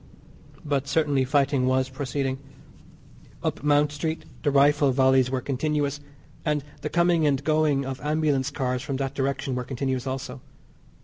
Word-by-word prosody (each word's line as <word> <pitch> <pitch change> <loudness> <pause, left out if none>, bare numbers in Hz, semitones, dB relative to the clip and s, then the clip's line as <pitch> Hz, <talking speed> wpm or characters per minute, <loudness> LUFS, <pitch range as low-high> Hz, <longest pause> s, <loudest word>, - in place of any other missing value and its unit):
But 140 -2 -1
certainly 145 -4 +2
fighting 135 -1 +2
was 130 0 +2
proceeding. 135 0 -3 1.0
Up - - -2
Mount 145 0 +3
Street, 160 +2 -3 0.2
the 145 - +1
rifle 145 0 +4
volleys 130 -1 +4
were 130 -1 -1
continuous, 145 +2 -1 0.4
and 150 -3 0 0.2
the 150 - -3
coming 170 -2 +3
and 140 -1 +1
going 155 -2 +2
of 130 -1 -5
ambulance 150 -3 +1
cars 125 -3 -2
from 140 -1 -3
that 135 0 -2
direction 135 -1 -2
were 125 0 -2
continuous 130 0 -3
also. 130 - -5
140 Hz, 145 wpm, -25 LUFS, 130-150 Hz, 1.0 s, rifle